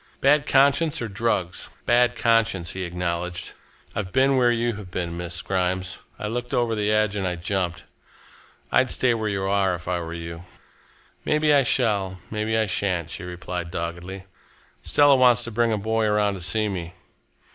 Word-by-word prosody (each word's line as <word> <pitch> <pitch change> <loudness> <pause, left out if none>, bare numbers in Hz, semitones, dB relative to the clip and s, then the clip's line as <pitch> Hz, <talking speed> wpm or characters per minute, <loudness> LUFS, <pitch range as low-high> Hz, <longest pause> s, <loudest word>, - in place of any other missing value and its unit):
"Bad 145 +2 +3
conscience 140 +3 +4
or 120 - -3
drugs?" 95 -5 -1
she - - -4
asked. - - -26
"Bad 120 +1 +3
conscience," 115 -7 +1
he 95 -1 -4
acknowledged. 90 0 -3 0.4
"I've 95 -4 -3
been 135 +4 +3
where 125 -2 +4
you 120 0 0
have 100 -3 -9
been 90 -2 -3
Miss 85 0 -4
Grimes. 95 0 -1 0.2
I 105 - -4
looked 120 +2 -3
over 120 -2 +1
the 105 -1 0
edge 110 -1 +2
and 95 -2 -1
I 90 - -1
jumped. 90 0 -2 0.9
I'd 130 - +3
stay 130 -2 +2
where 110 -2 -2
you 100 -1 -2
are, 95 -1 +1
if 90 0 -11
I 90 -1 0
were 85 -1 -6
you." 85 0 -7 0.8
"Maybe 150 0 +2
I 140 - +6
shall, 105 -7 +1
maybe 110 +1 -1
I 110 - +2
shan't," 90 -5 -1
she - - -6
replied 90 -1 -5
doggedly. 85 +3 -5 0.6
"Stella 145 -1 +5
wants 125 -2 +5
to 120 - -5
bring 115 +1 +1
a 110 - +1
boy 110 +2 0
around 105 -1 +2
to 95 - -7
see 105 +5 +1
me. 90 -3 -5
100 Hz, 185 wpm, -24 LUFS, 90-115 Hz, 0.9 s, I